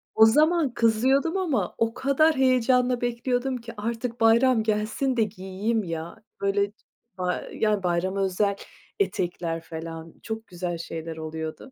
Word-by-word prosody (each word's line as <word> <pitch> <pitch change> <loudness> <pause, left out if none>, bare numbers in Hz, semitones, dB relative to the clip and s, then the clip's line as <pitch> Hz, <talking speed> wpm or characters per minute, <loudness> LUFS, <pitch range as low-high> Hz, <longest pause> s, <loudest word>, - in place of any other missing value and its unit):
O 220 - +8
zaman 305 +3 +3
kızıyordum 260 - +2
ama 280 - -1
o 225 0 +1
kadar 280 +5 +3
heyecanla 255 -1 +3
bekliyordum 245 +2 -1
ki, 230 -1 -9
artık 230 +2 -4
bayram 230 +1 +5
gelsin 220 +5 0
de 225 - +4
giyeyim 210 +2 -2
ya. 165 +4 -6 0.2
Böyle 200 0 +1 0.5
ba 180 -1 -1
yani 210 -3 +1
bayrama 180 +2 0
özel 200 +2 +1 0.4
etekler 175 - -1
falan, 165 0 -8
çok 225 0 -5
güzel 175 -1 -4
şeyler 165 -1 -6
oluyordu. 160 +9 -6
220 Hz, 135 wpm, -26 LUFS, 180-250 Hz, 0.5 s, O